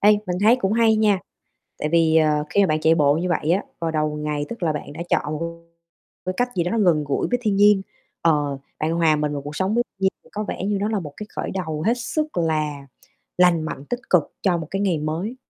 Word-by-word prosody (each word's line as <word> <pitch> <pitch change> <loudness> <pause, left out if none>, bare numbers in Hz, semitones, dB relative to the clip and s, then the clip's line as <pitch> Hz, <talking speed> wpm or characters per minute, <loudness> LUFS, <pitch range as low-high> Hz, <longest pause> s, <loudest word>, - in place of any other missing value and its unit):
Ê, 210 - +6 0.2
mình 180 -1 -1
thấy 230 +4 +6
cũng 195 -5 -1
hay 225 -1 +4
nha. 210 -3 +3 0.6
Tại 150 - -1
vì, 160 -1 +3
ờ, 150 -2 +3
khi 200 - +3
mà 195 - +5
bạn 155 -2 0
chạy 160 +1 +4
bộ 145 -3 +4
như 180 +3 -1
vậy 160 -2 0
á, 185 +4 +2 0.2
vào 165 -1 -1
đầu 155 -1 -1
ngày 150 -1 -2
tức 235 -4 -8
là 160 -2 +2
bạn 145 -1 -6
đã - - -9
chọn 150 +1 0 0.9
cái 185 - -1
cách 245 0 +1
gì 175 - +2
đó 175 - -1
nó 230 - +1
gần 170 -7 +3
gũi 140 -1 -1
với 245 - +2
thiên 205 -3 +1
nhiên. 205 -1 +5 0.4
Ờ, 145 -4 +1 0.2
bạn 155 +2 0
hòa 165 -2 +3
mình 150 0 -1
vào 140 -1 -4
cuộc 145 +1 -7
sống 190 +3 0
với 240 - +3
thiên - - -63
nhiên 190 - +4
thì - - -21
có 210 +1 -3
vẻ - - -4
như 205 +1 0
nó 210 - 0
là 215 -2 -1
một 150 -5 -8
cái 210 - -7
khởi - - -3
đầu 160 -5 -3
hết 230 - +4
sức 305 +4 -3
là 155 -4 -1 0.5
lành 180 -2 +4
mạnh, 145 -2 -6
tích 245 - -2
cực 180 -4 +5 0.2
cho 180 -3 +2
một 160 -2 -5
cái 195 +1 -1
ngày 185 -5 +1
mới. 165 +10 -3
170 Hz, 260 wpm, -22 LUFS, 150-205 Hz, 0.9 s, Ê